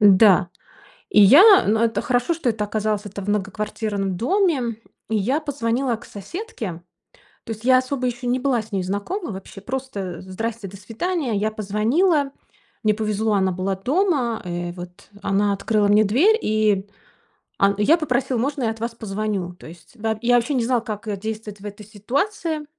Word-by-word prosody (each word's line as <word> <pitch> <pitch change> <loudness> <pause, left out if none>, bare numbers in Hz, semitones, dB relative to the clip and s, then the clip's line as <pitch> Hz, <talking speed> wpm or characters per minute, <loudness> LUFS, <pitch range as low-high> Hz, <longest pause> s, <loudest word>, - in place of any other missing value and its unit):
Да. 195 -3 +6 0.6
И 210 - +5
я 270 - +9 0.2
н 215 +2 +3
это 230 0 +1
хорошо, 245 +6 +1
что 315 -6 -2
это 215 -2 -2
оказалось 210 0 -1
это 200 0 -7
в 200 - -8
многоквартирном 205 -1 -2
доме, 260 - +1 0.3
и 220 - +1
я 255 +10 +1
позвонила 255 -4 -1
к 235 - -15
соседке. 205 - -7 0.6
То 225 - -3
есть 220 - -13
я 255 0 +6
особо 255 0 -3
еще 245 +1 -4
не 250 +1 +1
была 255 -4 +1
с 220 +1 -15
ней 190 -2 -1
знакома 205 - -3
вообще, 195 +1 -9
просто: 205 -8 -5
"Здрасте", 215 +3 -5
"До 195 +1 -10
свидания". 245 - -2
Я 215 +2 0
позвонила. 265 - +1 0.5
Мне 215 0 +3
повезло, 215 0 0
она 190 -2 +2
была 185 +2 -2
дома. 265 - 0
Э, 175 0 -3
вот 175 +2 -11
она 200 +1 +1
открыла 205 +1 +1
мне 210 +1 +5
дверь, 305 - +4
и 210 -2 +1 0.7
он 200 0 +4
я 220 +11 +4
попросил: 255 -5 0
"Можно 280 +2 -1
я 225 - +1
от 220 - -9
вас 230 0 -4
позвоню?" 205 -4 -3
То - - -13
есть, 170 +7 -14
да 220 0 -1
Я 245 +1 +3
вообще 240 +4 +1
не 245 - +1
знал, 245 -2 +1
как 215 -1 -6
действовать 215 -1 -6
в - - -11
этой 205 0 -8
ситуации. 300 - -2
220 Hz, 175 wpm, -22 LUFS, 200-255 Hz, 0.7 s, я